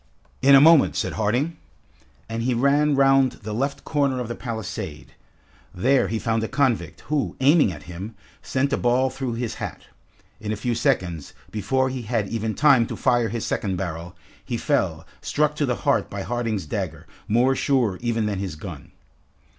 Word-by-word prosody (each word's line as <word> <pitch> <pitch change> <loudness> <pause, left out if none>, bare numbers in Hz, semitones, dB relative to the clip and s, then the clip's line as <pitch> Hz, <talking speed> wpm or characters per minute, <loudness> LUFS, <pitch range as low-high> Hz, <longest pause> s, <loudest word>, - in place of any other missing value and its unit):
"In 140 +1 +7
a - - +9
moment," 160 +1 +6
said - - -1
Harding. 125 +10 0 0.7
And 115 +1 -3
he 125 +1 0
ran 140 +4 +3
round 135 -1 +4
the 105 +1 -4
left 140 +5 -2
corner 140 -4 +1
of 125 - -3
the - - -2
palisade. 110 - -6 0.6
There 130 +8 +3
he 115 - -2
found 110 0 0
a - - -1
convict, 135 -4 0
who 150 -2 -2
aiming 140 - +5
at 75 - -9
him, 95 +6 -8 0.3
sent 140 +2 -1
a - - +2
ball 125 +2 +2
through 130 -1 -3
his 115 0 -3
hat. - - -5 0.6
In 105 - -4
a - - 0
few 120 +4 -2
seconds, 95 - -1 0.2
before 130 +5 0
he 130 -1 -4
had 110 -2 -1
even 110 -1 -2
time 135 -6 +5
to - - -5
fire 120 -3 +2
his 115 -1 -3
second 95 -3 -1
barrel, 85 -1 -5 0.3
he - - -3
fell, - - 0 0.2
struck 150 0 0
to 145 - +1
the 125 - +1
heart - - +2
by - - -5
Harding's 115 -3 -2
dagger, 75 - -4 0.2
more 125 +5 +3
sure 125 -10 +1
even 115 -2 0
than 100 -2 -2
his 95 -5 -4
gun. 75 - -9
120 Hz, 180 wpm, -23 LUFS, 105-135 Hz, 0.7 s, a